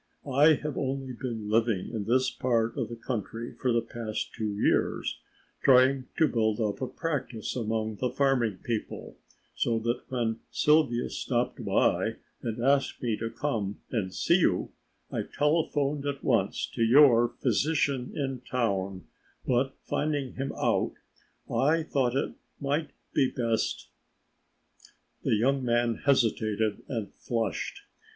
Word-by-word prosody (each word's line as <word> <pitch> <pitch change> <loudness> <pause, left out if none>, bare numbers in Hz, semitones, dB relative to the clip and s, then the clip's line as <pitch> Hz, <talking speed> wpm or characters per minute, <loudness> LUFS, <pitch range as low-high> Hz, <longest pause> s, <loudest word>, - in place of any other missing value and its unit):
I 150 +4 +6
have 150 0 -4
only 135 -1 -2
been 115 -3 -5
living 110 -3 +1
in 105 -3 -2
this 130 +3 +2
part 115 -3 0
of - - -2
the 120 - -5
country 115 0 -4
for 125 - -1
the 115 -1 +2
past 115 -2 -4
two 110 -1 -2
years, 100 - +1 0.4
trying 130 0 +5
to 160 - +5
build 110 -3 +1
up 105 0 -1
a 130 - -1
practice 135 - -3
among 110 -2 -2
the 125 - 0
farming 125 -6 +1
people, 115 -3 -4 0.4
so 115 -1 0
that 115 +2 -1
when 115 -3 -1
Sylvia 150 -6 +3
stopped - - -1
by - - +2 0.3
and 115 0 -3
asked 140 -1 +2
me 115 -3 +1
to 115 - -3
come 110 -8 -2
and 105 -6 -1
see 170 - +3
you 95 - +1 0.4
I - - -1
telephoned 145 -2 0
at 140 -1 -3
once - - +1
to - - -3
your 120 0 +7
physician 140 +1 +1
in 135 -3 -2
town, 100 -7 -1 0.4
but 130 +2 +1
finding 145 -4 -1
him 135 +1 -3
out - - +1 0.5
I 150 +7 +2
thought 130 -5 0
it 135 - 0 0.3
might 145 +2 -1 0.2
be 130 - +3
best 115 -2 -1 0.6
" - - -29
The - - +2
young 135 +5 +2
man 120 -1 +2
hesitated 110 -5 +2
and 115 -6 -4
flushed. 115 -4 -3
120 Hz, 140 wpm, -28 LUFS, 115-140 Hz, 0.6 s, your